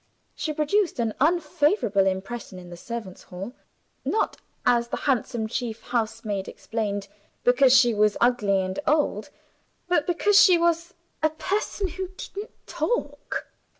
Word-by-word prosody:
She 310 - -3
produced 310 +5 +1
an 230 -3 0
unfavorable 300 - +2
impression 190 +2 -4
in 180 -1 -11
the - - -7
servants' 215 0 -7
hall 190 +6 -8 0.5
not 435 - 0 0.3
(as 240 -1 +3
the - - -3
handsome 240 -4 0
chief 230 -1 -4
housemaid 220 -4 -2
explained) 205 -3 -3 0.4
because 250 +1 +5
she 240 -2 +5
was 210 0 +2
ugly 220 -5 +3
and 185 0 -3
old, 300 +1 +1 0.6
but 350 -5 +2
because 395 +4 +5
she 365 -3 +7
was 340 0 0 0.3
"a 310 - +4
person 390 +5 -2
who 375 +2 -5
didn't 410 +2 -7 0.2
talk." 485 - -2
245 Hz, 135 wpm, -25 LUFS, 210-335 Hz, 0.6 s, she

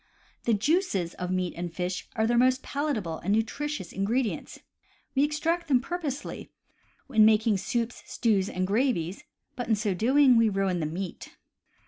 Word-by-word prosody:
The 230 - +3
juices 215 - +1
of 180 -1 -5
meats 185 -1 -1
and 175 -1 -3
fish 180 +2 -4
are 220 - +2
their 240 +2 +2
most 255 +2 +3
palatable 235 - -2
and 195 - -2
nutritious 225 - -2
ingredients. 220 +4 -1 0.6
We 275 - +3
extract 325 +4 0
them 265 -4 +4
purposely 290 -1 -5 0.6
in 220 -4 +6
making 220 -1 +4
soups, 235 +4 -2
stews, 205 -5 +1
and 185 0 -1
gravies, 200 -5 0 0.3
but 245 - -4
in 225 - +3
so 210 -1 -1
doing 255 +6 +4
we 230 -1 +4
ruin 195 -3 0
the 155 - -1
meat. 180 +3 -6
220 Hz, 155 wpm, -27 LUFS, 190-265 Hz, 0.6 s, in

